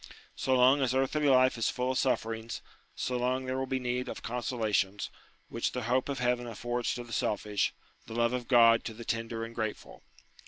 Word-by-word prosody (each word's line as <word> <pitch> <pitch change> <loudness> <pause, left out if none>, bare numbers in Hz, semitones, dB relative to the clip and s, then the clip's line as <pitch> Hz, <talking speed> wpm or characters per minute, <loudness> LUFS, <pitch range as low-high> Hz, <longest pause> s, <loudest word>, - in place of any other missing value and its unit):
So 130 - +1
long 130 +3 +5
as 130 -1 +1
earthly 140 +3 +2
life 130 -2 +4
is 115 - +2
full 125 +1 -1
of 130 - -1
sufferings, 115 -3 -1 0.3
so 125 - -2
long 130 +1 0
there 130 +1 -2
will 130 - -2
be 130 - 0
need 125 0 -2
of - - -7
consolations, 110 -5 -1 0.4
which 115 - -2
the 125 - -3
hope 125 +4 +1
of 140 - -2
heaven 125 -1 0
affords 120 +2 -2
to 120 - -5
the 115 -1 -10
selfish, 105 -1 0 0.4
the 110 - -7
love 120 +1 +2
of 125 -1 -3
God 115 -2 +6
to 110 - -5
the 115 +1 -9
tender 115 0 -2
and 115 - -10
grateful. 110 -2 -5
120 Hz, 200 wpm, -30 LUFS, 115-130 Hz, 0.4 s, God